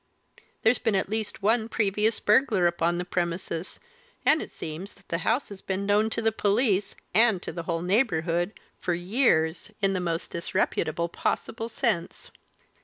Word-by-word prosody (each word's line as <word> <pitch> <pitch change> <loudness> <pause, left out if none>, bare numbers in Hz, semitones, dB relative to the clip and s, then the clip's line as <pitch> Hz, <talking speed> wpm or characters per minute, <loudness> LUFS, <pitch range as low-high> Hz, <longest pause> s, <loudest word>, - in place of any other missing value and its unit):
There's 225 +3 +4
been 225 -4 +1
at 190 - 0
least 220 -2 -3
one 220 +2 +2
previous 210 +1 +1
burglar 210 -4 +3
upon 170 0 +1
the 180 - -2
premises, 175 0 -3 0.5
and 315 - +5
it - - -6
seems 165 +5 -7
that 200 - -25
the 165 - 0
house 230 +8 0
has 200 -2 -9
been 195 +1 -2
known 210 +2 +3
to 230 - -3
the 225 - +3
police 205 -1 +1 0.2
and 225 -4 +5
to - - -4
the 170 - -5
whole 165 0 0
neighbourhood 180 -3 +1 0.3
for 175 -2 0
years, 175 -4 +1
in 195 -1 +2
the 185 - 0
most 170 -2 -2
disreputable 170 -1 -1
possible 225 +6 -2
sense." 220 -9 -2
195 Hz, 165 wpm, -27 LUFS, 170-220 Hz, 0.5 s, and